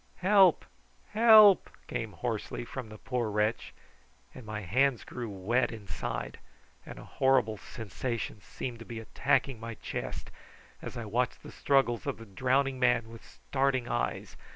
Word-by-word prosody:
"Help, 190 Hz, -3 st, +5 dB, 0.5 s
help!" 215 Hz, -3 st, +7 dB, 0.2 s
came 110 Hz, -2 st, -4 dB
hoarsely 120 Hz, 0 st, -4 dB
from 125 Hz, -1 st, -7 dB
the 110 Hz, -, -10 dB
poor 125 Hz, -1 st, -2 dB
wretch; 105 Hz, +1 st, -1 dB, 0.6 s
and 115 Hz, -, -11 dB
my 105 Hz, 0 st, -4 dB
hands 125 Hz, +6 st, +1 dB
grew 120 Hz, -3 st, -6 dB
wet 115 Hz, +6 st, 0 dB
inside, 110 Hz, -4 st, -5 dB, 0.5 s
and -, -, -9 dB
a -, -, -10 dB
horrible 130 Hz, -5 st, +2 dB
sensation 110 Hz, +1 st, -5 dB
seemed 120 Hz, +5 st, -6 dB
to -, -, -8 dB
be 115 Hz, -1 st, -7 dB
attacking 130 Hz, +3 st, 0 dB
my 115 Hz, 0 st, -6 dB
chest, -, -, -6 dB, 0.5 s
as -, -, -7 dB
I 115 Hz, -, -4 dB
watched 120 Hz, +4 st, -1 dB
the -, -, -10 dB
struggles 135 Hz, -5 st, +1 dB
of -, -, -2 dB
the 115 Hz, -, -11 dB
drowning 130 Hz, +6 st, 0 dB
man 120 Hz, -2 st, +2 dB
with 115 Hz, 0 st, -12 dB
starting 135 Hz, -2 st, -1 dB
eyes. -, -, -2 dB
120 Hz, 150 wpm, -30 LUFS, 110-135 Hz, 0.6 s, help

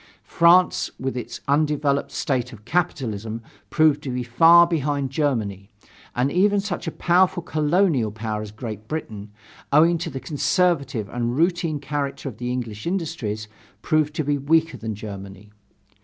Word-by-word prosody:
France, 175 Hz, +2 st, +4 dB
with 130 Hz, 0 st, -3 dB
its 125 Hz, -, -6 dB
undeveloped 145 Hz, -1 st, +1 dB
state 125 Hz, -3 st, -1 dB
of 110 Hz, -3 st, -13 dB
capitalism, 115 Hz, -, -2 dB, 0.3 s
proved 155 Hz, -2 st, +3 dB
to 140 Hz, -, -6 dB
be 125 Hz, 0 st, -2 dB
far 165 Hz, +9 st, +6 dB
behind 145 Hz, -5 st, -1 dB
Germany, 110 Hz, -10 st, -1 dB, 0.5 s
and 125 Hz, +3 st, +1 dB
even 200 Hz, +4 st, +3 dB
such 195 Hz, -4 st, -4 dB
a -, -, -1 dB
powerful 175 Hz, +1 st, +2 dB
colonial 155 Hz, -, +1 dB
power 110 Hz, 0 st, -4 dB
as 105 Hz, -, -6 dB
Great 110 Hz, -1 st, -7 dB
Britain, 105 Hz, -10 st, -6 dB, 0.4 s
owing 165 Hz, +3 st, +5 dB
to 170 Hz, 0 st, -3 dB
the 135 Hz, -, -5 dB
conservative 140 Hz, -, 0 dB
and 120 Hz, +1 st, -2 dB
routine 170 Hz, -2 st, +1 dB
character 145 Hz, -1 st, -4 dB
of 115 Hz, -5 st, -7 dB
the 125 Hz, 0 st, -3 dB
English 115 Hz, -1 st, -4 dB
industries, 115 Hz, -, -3 dB, 0.4 s
proved 155 Hz, -2 st, +1 dB
to 155 Hz, -, 0 dB
be 145 Hz, 0 st, 0 dB
weaker 160 Hz, +4 st, +2 dB
than 110 Hz, -1 st, -5 dB
Germany. 100 Hz, -1 st, -9 dB
140 Hz, 150 wpm, -23 LUFS, 115-165 Hz, 0.5 s, far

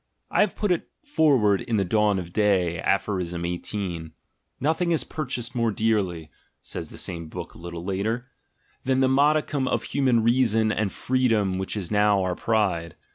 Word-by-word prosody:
I -, -, +3 dB
have -, -, +2 dB
put 210 Hz, -3 st, 0 dB
it 175 Hz, -, -1 dB
forward 140 Hz, -, +3 dB
in 115 Hz, -3 st, -1 dB
the 100 Hz, -, +1 dB
Dawn 105 Hz, +1 st, +2 dB
of 90 Hz, -2 st, -6 dB
Day, 95 Hz, -5 st, +2 dB
Aph. 95 Hz, -, +1 dB
18. 85 Hz, -2 st, -3 dB, 0.5 s
"Nothing 160 Hz, +5 st, +1 dB
is 165 Hz, -, +2 dB
purchased 125 Hz, -5 st, -4 dB
more 115 Hz, -2 st, +1 dB
dearly," 95 Hz, -8 st, 0 dB, 0.3 s
says -, -, -7 dB
the -, -, -11 dB
same 85 Hz, -2 st, -4 dB
book -, -, -7 dB
a -, -, -14 dB
little 85 Hz, 0 st, -7 dB
later, 105 Hz, +6 st, -1 dB, 0.6 s
"than 130 Hz, 0 st, +1 dB
the 130 Hz, -, +4 dB
modicum 145 Hz, 0 st, +2 dB
of -, -, 0 dB
human 125 Hz, -5 st, +2 dB
reason 115 Hz, -2 st, +3 dB
and 105 Hz, -2 st, 0 dB
freedom 115 Hz, -7 st, +1 dB
which 95 Hz, +3 st, -3 dB
is 95 Hz, -2 st, -4 dB
now 105 Hz, -2 st, +3 dB
our 90 Hz, -1 st, 0 dB
pride. 90 Hz, -6 st, 0 dB
105 Hz, 170 wpm, -25 LUFS, 90-125 Hz, 0.6 s, the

